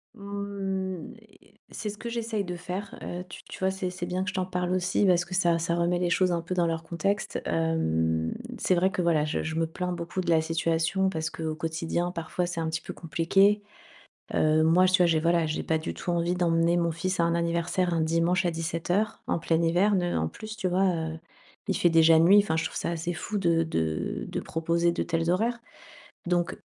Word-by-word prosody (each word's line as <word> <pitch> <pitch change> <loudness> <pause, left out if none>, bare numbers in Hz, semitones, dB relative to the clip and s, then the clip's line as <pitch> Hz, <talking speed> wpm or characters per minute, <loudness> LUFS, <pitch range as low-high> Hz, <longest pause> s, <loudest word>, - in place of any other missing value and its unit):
Mmh, 200 -3 -4 0.6
c'est 215 - -5
ce 205 - -7
que 230 +2 -6
j'essaye 230 -3 -2
de 180 -1 -5
faire, 180 +3 -6
heu, 180 +1 -5
tu - - -10
tu - - -10
vois 190 - +2
c'est 190 -1 -3
c'est 180 -1 -5
bien 180 +1 -1
que 205 - -2
je - - -6
t'en 185 -2 -1
parle 180 -1 -2
aussi 185 +2 +1
parce 180 -2 +3
que 180 +1 -5
ça 170 -3 +3
ça 165 +1 0
remet 175 +1 +1
les 180 - 0
choses 185 +1 +2
un 170 -1 0
peu 170 +2 -4
dans 175 -1 +2
leur 165 -1 -2
contexte. 195 +5 -2
Hem, 80 - 0 0.2
c'est 185 - +1
vrai 180 +2 +3
que 185 - -1
voilà 160 -3 +2
je 155 - -2
je 160 0 -3
me 165 0 +1
plains 180 +2 -4
beaucoup 175 +1 -3
de 175 - -4
la 160 -1 +4
situation 165 +3 0
parce 160 -3 -2
qu'au 160 -1 -4
quotidien 165 +2 -2
parfois 170 +1 -3
c'est 175 -1 -4
un 160 -1 -1
petit 160 +1 -3
peu - - -7
compliqué. 195 +6 +2 0.7
Heu, 155 0 +3
moi, 165 +3 +5
tu 185 0 +3
vois - - +5
j'ai, 165 -2 +2
voilà, 170 0 +2
j'ai 155 - -2
pas 160 - 0
du 155 - -5
tout 175 - -4
envie 175 +1 +1
d'emmener 170 -1 +2
mon 170 -1 +1
fils 185 +3 -2
à 170 - +3
un 170 - +1
anniversaire 170 +1 0
un 165 - +1
dimanche 165 +4 +1
à 175 - +2
17:00 170 +5 -2
en - - 0
plein 165 0 +1
hiver, 180 +5 +3
ne 175 -2 0
en 80 0 0
plus, 215 - -8
tu 205 -4 -1
vois, 185 +2 +2
heu, 160 -1 -4 0.5
il 195 - 0
fait 175 - +4
déjà 165 0 +6
nuit, 180 +6 +7
enfin 180 -6 -1
je 165 - 0
trouve - - -7
ça - - -1
assez 170 +1 -2
fou 210 +4 -3
de 170 -3 +2
de 80 - -2
de - - -3
proposer 170 +1 0
de - - -1
tels 165 0 0
horaires. 230 +7 +1 0.7
Donc 175 0 0
170 Hz, 225 wpm, -27 LUFS, 165-185 Hz, 0.7 s, nuit